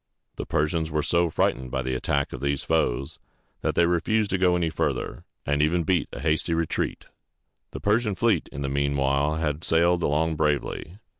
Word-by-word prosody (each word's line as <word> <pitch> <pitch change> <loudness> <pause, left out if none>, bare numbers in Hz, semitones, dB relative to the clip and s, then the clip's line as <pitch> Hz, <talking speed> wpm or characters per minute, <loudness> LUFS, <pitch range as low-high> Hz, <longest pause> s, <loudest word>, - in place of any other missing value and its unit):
The - - -5
Persians 80 +2 0
were 75 -1 -1
so 85 0 +2
frightened 65 -4 0
by 65 0 -2
the 65 +1 -2
attack 70 +2 -1
of - - -6
these 70 0 -1
foes, 70 -5 0 0.4
that - - -1
they 85 - +4
refused 100 +5 +1
to 95 - +1
go 90 -1 +4
any 85 -2 0
farther, 80 - -2 0.2
and 75 +1 +1
even 85 +3 +2
beat 85 +1 +1
a 60 - -7
hasty 80 +2 +1
retreat. 80 -1 -2 0.6
The - - -7
Persian 105 0 +1
fleet 115 +4 +1
in 70 - -5
the - - -1
mean 70 +1 0
while 70 +2 +1
had 80 -1 -2
sailed 85 +2 +3
along 80 +1 +1
bravely. 75 +3 -1
80 Hz, 190 wpm, -25 LUFS, 70-85 Hz, 0.6 s, they